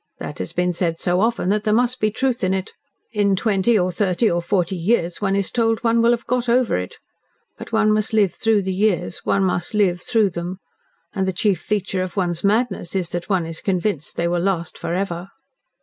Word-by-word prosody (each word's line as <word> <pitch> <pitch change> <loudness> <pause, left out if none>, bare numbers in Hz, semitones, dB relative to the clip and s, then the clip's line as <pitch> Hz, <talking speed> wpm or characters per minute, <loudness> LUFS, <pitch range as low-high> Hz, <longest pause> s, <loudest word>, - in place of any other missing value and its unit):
That - - -7
has 90 - -4
been 180 0 0
said 165 -1 -1
so 180 +2 +1
often 225 -4 +1
that 210 +1 +1
there 215 -1 +2
must 245 +2 +1
be 215 - +2
truth 245 +2 -1
in 185 +1 +2
it. 190 -1 -4 0.4
In 205 -3 +2
twenty 215 +2 +2
or 180 -1 +1
thirty 190 +4 +1
or 175 0 0
forty 180 0 0
years 175 -1 0
one 195 -1 +1
is 200 -1 -1
told 225 -2 +1
one 230 0 +3
will 230 - +4
have 240 -1 +1
got 245 0 -1
over 245 0 +3
it. 90 0 -4 0.6
But - - -10
one 220 -1 +3
must 215 0 0
live 210 -4 +3
through 220 -3 +1
the 190 0 -2
years 190 -3 0
one 195 - +2
must 180 +1 -1
LIVE 180 -4 +2
through 215 -2 +2
them 175 +2 -5 0.6
and 190 -1 -1
the - - +1
chief 195 -1 +1
feature 195 -3 -1
of 185 +2 -5
one's 175 -3 -1
madness 200 -4 0
is 180 -3 -1
that 175 +2 -4
one 185 -4 +1
is 165 0 -6
convinced 185 -5 -1
that - - -1
they - - +2
will 175 0 0
last 175 -3 -1
forever." 175 +1 -3
195 Hz, 220 wpm, -21 LUFS, 175-215 Hz, 0.6 s, will